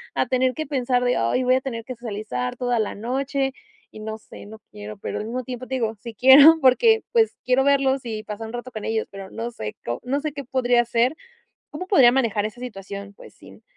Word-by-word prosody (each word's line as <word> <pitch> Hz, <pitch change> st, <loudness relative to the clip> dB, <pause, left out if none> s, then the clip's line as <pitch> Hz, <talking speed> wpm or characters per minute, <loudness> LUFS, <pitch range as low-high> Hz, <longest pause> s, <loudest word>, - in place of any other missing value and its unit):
a -, -, +1 dB
tener 255 Hz, 0 st, +1 dB
que 310 Hz, -, -3 dB
pensar 250 Hz, -3 st, 0 dB
de: 245 Hz, 0 st, +1 dB
"Ay 115 Hz, -, +1 dB
voy 255 Hz, 0 st, +3 dB
a 260 Hz, -, 0 dB
tener 230 Hz, -4 st, -5 dB
que 255 Hz, -, -6 dB
socializar 210 Hz, -, -4 dB
toda 245 Hz, -1 st, 0 dB
la 215 Hz, -, -2 dB
noche 270 Hz, +4 st, -2 dB, 0.4 s
y 215 Hz, -, -11 dB
no 220 Hz, 0 st, -5 dB
sé", 215 Hz, -, -13 dB
no 220 Hz, +1 st, -11 dB
quiero 210 Hz, 0 st, -9 dB
pero -, -, -5 dB
al 210 Hz, -, -5 dB
mismo 250 Hz, +3 st, -4 dB
tiempo, 255 Hz, +1 st, -7 dB
te 265 Hz, -, -3 dB
digo, 225 Hz, -3 st, -1 dB
sí 235 Hz, 0 st, -8 dB
quiero, 280 Hz, +7 st, +8 dB
porque, 445 Hz, -, +4 dB
pues, 455 Hz, -2 st, +2 dB
quiero 255 Hz, +1 st, +3 dB
verlos, 275 Hz, -1 st, +2 dB
y 215 Hz, -2 st, -4 dB
pasar 215 Hz, +1 st, -6 dB
un 225 Hz, -, -10 dB
rato 245 Hz, +1 st, -6 dB
con 215 Hz, -2 st, -6 dB
ellos, 220 Hz, 0 st, -1 dB
pero, 195 Hz, -1 st, -9 dB
no 230 Hz, +1 st, -5 dB
sé, 105 Hz, -, -6 dB
co 120 Hz, 0 st, -3 dB
no 270 Hz, +3 st, -1 dB
sé 305 Hz, -1 st, -3 dB
qué 280 Hz, -2 st, -7 dB
podría 245 Hz, -2 st, +2 dB
hacer. 240 Hz, +4 st, +1 dB, 0.6 s
¿Cómo 365 Hz, +5 st, -6 dB
podría 260 Hz, -12 st, +6 dB
manejar 220 Hz, -6 st, +1 dB
esa 230 Hz, +3 st, -7 dB
situación? 200 Hz, -3 st, -8 dB
Pues -, -, -15 dB
sin -, -, -17 dB
245 Hz, 230 wpm, -23 LUFS, 220-265 Hz, 0.6 s, quiero